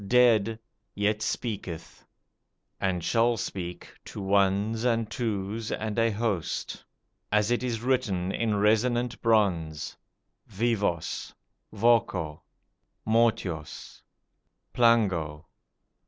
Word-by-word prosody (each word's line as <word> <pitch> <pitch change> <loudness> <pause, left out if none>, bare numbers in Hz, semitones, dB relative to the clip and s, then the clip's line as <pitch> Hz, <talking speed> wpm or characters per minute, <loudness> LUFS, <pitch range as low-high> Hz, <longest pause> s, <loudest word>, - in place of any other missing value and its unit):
dead, 115 -2 +4 0.4
yet 105 +1 0
speaketh; 105 -7 -4 0.8
and 90 -3 -1
shall 115 +5 +2
speak, 90 -3 -5
to - - -8
ones 100 +3 +1
and 115 -3 +1
twos 110 -1 -3
and 110 +1 -2
a 115 0 +4
host. 105 -5 -2 0.5
As 105 +2 +2
it 120 - +2
is 120 -3 -2
written 105 -8 0
in 110 0 0
resonant 120 +4 +1
bronze: 90 -9 +1 0.5
VIVOS. 105 -6 -1 0.4
VOCO. 100 -8 +1 0.6
MORTUOS. 110 -9 0 0.7
PLANGO 95 -11 +2
105 Hz, 90 wpm, -27 LUFS, 95-115 Hz, 0.8 s, dead